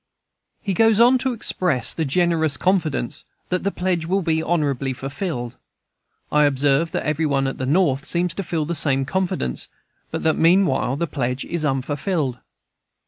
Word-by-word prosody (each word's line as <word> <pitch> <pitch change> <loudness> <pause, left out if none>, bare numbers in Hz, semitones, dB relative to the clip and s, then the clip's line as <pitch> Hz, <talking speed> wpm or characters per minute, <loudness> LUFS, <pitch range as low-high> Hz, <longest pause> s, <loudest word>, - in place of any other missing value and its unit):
He 195 - -1
goes 225 +3 +3
on 250 +2 +6
to 260 +1 -1
express 180 - 0
the 160 - -2
generous 160 -1 +2
confidence 170 -9 -1 0.3
that 180 - 0
"the 200 - 0
pledge 180 -4 -2
will 190 +2 0
be 160 -1 +1
honorably 140 -6 -1
fulfilled." 135 -2 -5 0.7
I 150 0 +4
observe 145 +3 +2
that - - -2
every 155 +1 0
one 135 -1 +1
at 135 - -3
the 130 - -2
North 145 -3 +2
seems 175 -1 -1
to 195 - -3
feel 160 -3 -2
the 170 - -3
same 135 -4 +2
confidence, 175 - -2 0.4
but - - -4
that, 160 - +2
meanwhile, 165 -7 +3
the 170 +4 -1
pledge 125 -4 -3
is 170 -2 -3
unfulfilled. 140 0 -1
160 Hz, 165 wpm, -22 LUFS, 135-180 Hz, 0.7 s, on